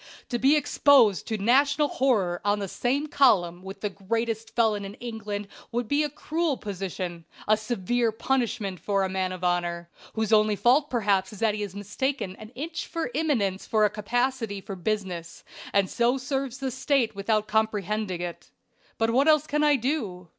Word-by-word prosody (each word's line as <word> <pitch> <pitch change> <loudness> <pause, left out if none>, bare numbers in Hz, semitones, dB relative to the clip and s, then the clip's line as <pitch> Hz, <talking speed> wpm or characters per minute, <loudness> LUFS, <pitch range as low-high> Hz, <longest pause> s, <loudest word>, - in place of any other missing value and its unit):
"To 240 - -1
be 275 +5 +5
exposed 275 -8 +4
to 220 - -1
national 280 +7 +3
horror 210 -12 +1
on 205 0 +2
the 200 -1 -3
same 265 +9 -1
column 205 - +3
with 190 +1 -9
the 210 - -1
greatest 225 +3 -3
felon 220 -3 +2
in 200 +1 -7
England 210 -4 -5 0.2
would 240 -1 -2
be 285 +4 +2
a 300 - 0
cruel 310 0 -1
position, 185 -3 -5 0.2
a 215 - +5
severe 225 +1 0
punishment 220 -5 -1
for 200 -1 0
a 190 - -1
man 185 -1 -1
of 185 -1 -7
honor, 175 -1 -1 0.2
whose 220 0 0
only 215 -1 +4
fault 265 +8 +3
perhaps 200 -5 +1
is 210 - -10
that 220 +1 +2
he 210 - -4
has 200 -2 -5
mistaken 205 +1 -3
an 215 +1 -11
itch 320 +6 -5
for 330 -7 -3
eminence 240 -11 0
for 215 -1 +3
a 210 - +1
capacity 235 0 -1
for 195 0 -7
business, 180 -3 -4 0.3
and 200 -1 +3
so 240 +6 +1
serves 270 -1 -3
the 270 -2 -3
State 260 -3 +1
without 215 +1 0
comprehending 210 -3 -1
it. 175 -1 -6 0.5
But 225 0 +1
what 270 +5 +3
else 305 -1 +5
can 300 0 0
I 295 -1 +5
do? 220 - -2
220 Hz, 180 wpm, -26 LUFS, 195-260 Hz, 0.5 s, be